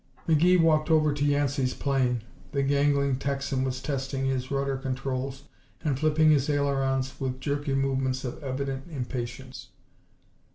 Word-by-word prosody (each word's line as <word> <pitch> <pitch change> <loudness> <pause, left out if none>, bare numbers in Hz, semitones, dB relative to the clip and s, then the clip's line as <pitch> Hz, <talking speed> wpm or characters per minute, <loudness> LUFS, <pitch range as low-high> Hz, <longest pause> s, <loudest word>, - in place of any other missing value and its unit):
McGee 170 +3 +5
walked 155 -1 +3
over 155 -2 +4
to 145 0 -2
Yancey's 145 -2 +1
plane. 125 -4 0 0.3
The 140 -1 +1
gangling 140 -1 +2
Texan 140 -1 -1
was 130 -1 -2
testing 135 -1 -2
his 130 -1 -1
rudder 140 0 0
controls 135 +1 -3 0.4
and 140 -4 0
flipping 155 +1 +4
his 145 -1 +2
ailerons 135 -2 0
with 130 -2 -3
jerky 145 0 -1
movements 135 -1 0
of 125 +5 -6
evident 135 0 -3
impatience. 125 -3 -5
135 Hz, 135 wpm, -27 LUFS, 130-145 Hz, 0.4 s, McGee